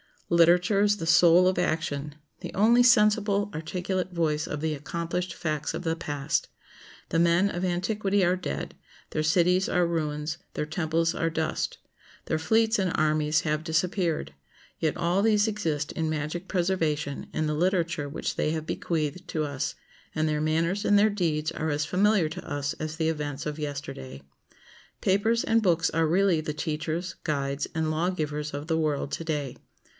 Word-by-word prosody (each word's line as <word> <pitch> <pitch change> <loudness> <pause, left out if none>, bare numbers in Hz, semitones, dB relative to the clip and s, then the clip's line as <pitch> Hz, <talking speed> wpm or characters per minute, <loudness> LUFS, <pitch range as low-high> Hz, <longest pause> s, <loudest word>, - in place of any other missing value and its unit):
Literature 175 +4 +4
is 205 0 +3
the 165 - -4
soul 170 +2 +6
of 185 -1 +1
action, 150 -4 -2 0.2
the - - -7
only 230 +5 +5
sensible 210 -3 +4
articulate 180 +3 -3
voice 155 -3 0
of 150 - -4
the 160 -1 0
accomplished 170 +4 -3
facts 155 -3 -2
of - - -5
the 165 -1 0
past. 145 -3 -2 0.6
The 165 - +1
men 170 +3 +4
of 175 - -3
antiquity 195 +2 0
are 180 +1 +2
dead; 70 - -4 0.4
their 155 - -1
cities 180 +4 +3
are 180 -1 +2
ruins; 155 -2 -2 0.2
their - - -1
temples 165 +1 0
are 165 - 0
dust; 160 -1 -2 0.5
their 160 - -1
fleets 220 +6 +2
and 185 -3 0
armies 155 0 +2
have 155 0 -1
disappeared; 170 - -1 0.5
yet 155 -2 0
all 175 +3 +1
these 215 0 +3
exist 160 -8 -2
in 160 -1 -2
magic 155 +4 -3
preservation 165 -6 -1
in 155 - 0
the 150 - 0
literature 170 -2 0
which 140 - -4
they 150 - +1
have 160 -1 -3
bequeathed 165 +2 -2
to 155 -3 -1
us, 140 -1 -3 0.4
and 155 0 +1
their 150 -1 0
manners 165 +5 0
and 205 - +5
their 210 +1 +4
deeds 160 -6 -1
are 160 - -3
as 150 0 0
familiar 190 -1 +2
to 160 - -8
us 145 -1 -2
as 155 0 -4
the 160 -1 0
events 145 -3 -3
of 150 0 -4
yesterday. 105 - -6 0.8
Papers 220 +5 +2
and 230 0 +2
books 175 -3 +2
are 165 0 +2
really 180 0 +3
the 150 -1 -4
teachers, 155 +3 -3
guides, 140 -2 -1
and 160 -1 0
lawgivers 155 -3 -2
of 145 +1 -4
the 160 -1 +1
world 150 -3 -1
to 165 - -4
day. 145 -5 -3
165 Hz, 170 wpm, -27 LUFS, 150-185 Hz, 0.8 s, soul